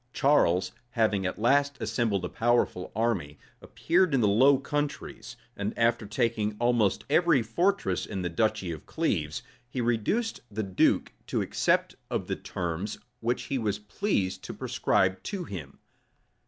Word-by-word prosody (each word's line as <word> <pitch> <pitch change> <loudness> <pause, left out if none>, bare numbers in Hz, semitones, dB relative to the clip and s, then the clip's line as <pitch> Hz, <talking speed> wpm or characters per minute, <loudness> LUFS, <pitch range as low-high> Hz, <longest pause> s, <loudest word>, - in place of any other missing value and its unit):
Charles, 95 - +3 0.2
having 105 -5 +1
at 90 - -4
last 140 +5 +2
assembled 110 -3 0
a - - -1
powerful 115 -5 +1
army, 100 -11 -1 0.2
appeared 175 -3 +1
in 130 - +3
the 105 - +4
Low 130 +7 +5
Countries; 140 -3 -4 0.2
and 100 +1 -3
after 115 -2 +2
taking 110 -1 0
almost 120 -4 +2
every 155 -3 +4
fortress 180 - 0
in 95 -3 -4
the - - 0
duchy 105 0 0
of 80 -3 -8
Cleves, 85 - -1 0.3
he 130 - -4
reduced 120 - 0
the 110 +1 -3
duke 95 -2 +2
to - - 0
accept - - +1 0.2
of - - -2
the - - -2
terms 90 +4 -4 0.2
which 120 +1 -1
he 130 +2 -2
was 105 -3 -1
pleased 105 - -2
to - - -6
prescribe 95 0 +1
to 195 -3 -4
him. 80 - -8
115 Hz, 150 wpm, -28 LUFS, 100-135 Hz, 0.3 s, Low